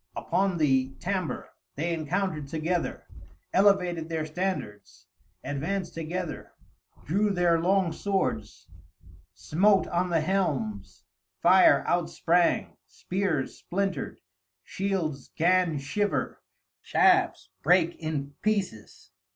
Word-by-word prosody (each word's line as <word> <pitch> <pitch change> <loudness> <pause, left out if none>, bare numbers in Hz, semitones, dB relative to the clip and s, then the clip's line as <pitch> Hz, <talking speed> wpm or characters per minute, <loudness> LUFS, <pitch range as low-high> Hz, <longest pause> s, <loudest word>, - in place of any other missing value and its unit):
Upon 195 -2 0
the 135 -3 +1
Tambre 185 -2 -3 0.3
they 170 +4 -1
encountered 160 -1 -2
together; 160 +4 -2 0.5
elevated 180 -5 +3
their 160 -1 -2
standards; 105 - -4 0.4
advanced 170 +6 -3
together; 165 +1 -5 0.5
drew 200 +7 +1
their 175 -4 +2
long 185 0 +2
swords; 190 - -2 0.7
smote 190 - +3
on 180 +1 0
the 165 -2 +2
helms; 110 - -2 0.4
fire 185 +2 +6
outsprang; 175 0 +1
spears 180 -7 -2
splintered; 190 -5 -3 0.5
shields 180 -8 -3
'gan 175 -1 +3
shiver; 185 +9 -2 0.4
shafts 85 - +2
brake 170 +1 +3
in 145 -3 -4
pieces. 195 - -3
170 Hz, 95 wpm, -27 LUFS, 150-190 Hz, 0.7 s, fire